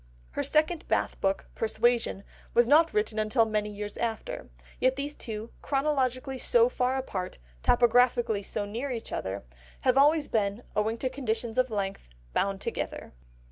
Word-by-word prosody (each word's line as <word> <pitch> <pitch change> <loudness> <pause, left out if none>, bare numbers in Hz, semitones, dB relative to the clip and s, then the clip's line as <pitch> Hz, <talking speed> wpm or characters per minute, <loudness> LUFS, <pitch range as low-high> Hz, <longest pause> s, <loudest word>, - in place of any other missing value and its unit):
The - - -1
second 315 +2 +1
Bath - - 0
book, 195 0 +1
Persuasion, 225 -2 +1 0.3
was 240 - +6
not 320 +4 +6
written 215 +1 0
until 215 +2 +3
many 210 -1 -1
years 205 0 -6
after, 225 - -3 0.3
yet 260 +1 +3
these 285 +1 -3
two, 220 -4 -6
chronologically 270 -2 0
so 480 - +4
far 255 - 0
apart, 190 -8 -4 0.2
topographically 240 -2 +4
so 205 - -3
near 235 +7 -4
each 235 -3 -5
other, 95 +1 -3 0.4
have 255 +1 +4
always 295 +1 +5
been, 210 +1 0
owing 220 +2 +1
to 260 - -1
conditions 230 -2 -2
of 255 0 +3
length, 195 - -3 0.3
bound 195 0 0
together. - - -4
235 Hz, 150 wpm, -28 LUFS, 210-265 Hz, 0.4 s, was